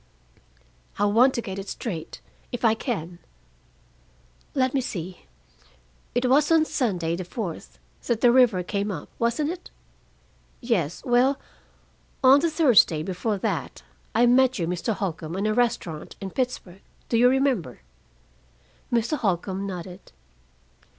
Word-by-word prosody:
"I 205 - +2
want 235 +6 +4
to 235 - -2
get 190 0 -5
it 195 - -7
straight, 170 -10 -6 0.3
if 245 -1 -2
I 220 - +5
can. 180 - -4 1.4
Let 260 -2 +1
me 275 - +1
see. 180 - -6 0.9
It 245 - +1
was 290 +5 +3
on 320 -1 +5
Sunday, 180 - -1
the 185 - -4
fourth, 180 -1 -6 0.3
that 235 -2 0
the 240 - +6
river 240 -8 +4
came 200 +3 -2
up, 165 -7 -6
wasn't 240 +7 0
it? 360 0 -9 0.9
Yes. 185 - -1
Well, 255 +3 +3 0.8
on 265 +2 +8
the 335 +3 +1
Thursday 245 - +4
before 195 +4 -2
that - - -3 0.3
I 235 - +5
met 255 +1 +4
you, 170 - -1
Mr. 180 +6 -2
Holcombe, 165 -4 -4
in 200 - -1
a 215 - +1
restaurant 230 -10 -1
in 195 -1 -6
Pittsburgh. 205 -7 -4 0.3
Do - - -1
you 245 +2 +6
remember?" 260 - 0 1.1
Mr. 235 +5 +1
Holcombe 190 0 -1
nodded. 180 0 -8
225 Hz, 135 wpm, -25 LUFS, 180-250 Hz, 1.4 s, on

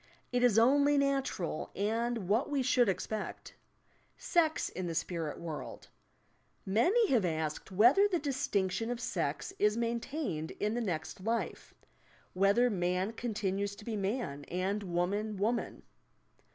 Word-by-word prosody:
It 245 0 +1
is 245 -4 +4
only 285 +5 +5
natural, 270 - -1
and 225 0 -1
what 220 +7 +2
we 280 -3 0
should 245 -3 +3
expect 210 +3 -4
L - - -26 0.6
SEX 320 -3 +1
IN 185 -1 -4
THE 165 - -3
SPIRIT 165 -2 -2
WORLD 165 -3 -7 0.8
Many 360 - +3
have 240 -6 +3
asked 160 +1 -2
whether 240 - +6
the 375 -4 0
distinction 225 - -1
of 245 -1 -2
sex 250 +8 -2
is 210 +1 +3
maintained 235 - -2
in 210 +1 0
the 240 - -1
next 180 -4 -3
life; 230 +2 -3 0.6
whether 200 +6 +4
man 185 -1 0
continues 205 -3 -2
to 210 - -13
be 230 - -3
man 195 - -2
and 190 +4 -2
woman 200 +4 -1
woman. 225 +4 -1
215 Hz, 140 wpm, -32 LUFS, 185-245 Hz, 0.8 s, whether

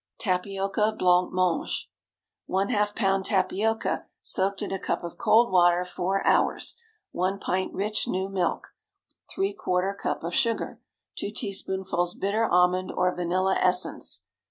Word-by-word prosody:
TAPIOCA 195 +2 0
BLANC 180 0 +3
MANGE. 185 -2 0 0.6
✠ - - -10 0.2
½ 210 0 +1
lb. 195 -3 +1
tapioca, 210 +3 0 0.2
soaked 195 +1 0
in - - -4
a 195 - -2
cup - - -2
of 170 - -7
cold 230 -1 +4
water 175 -1 +4
four 185 +2 -2
hours. - - +2 0.4
1 185 +2 -1
pint 185 -1 -1
rich 210 +2 -1
new 190 +1 -1
milk. 190 -3 -1 0.7
¾ 200 - 0
cup - - -3
of 170 +1 -3
sugar. 230 -4 0 0.4
2 - - -2
teaspoonfuls 190 -3 -2
bitter 215 +3 0
almond 180 +1 +3
or 180 0 +1
vanilla 185 +2 +1
essence. 180 0 0
190 Hz, 130 wpm, -26 LUFS, 180-200 Hz, 0.7 s, cold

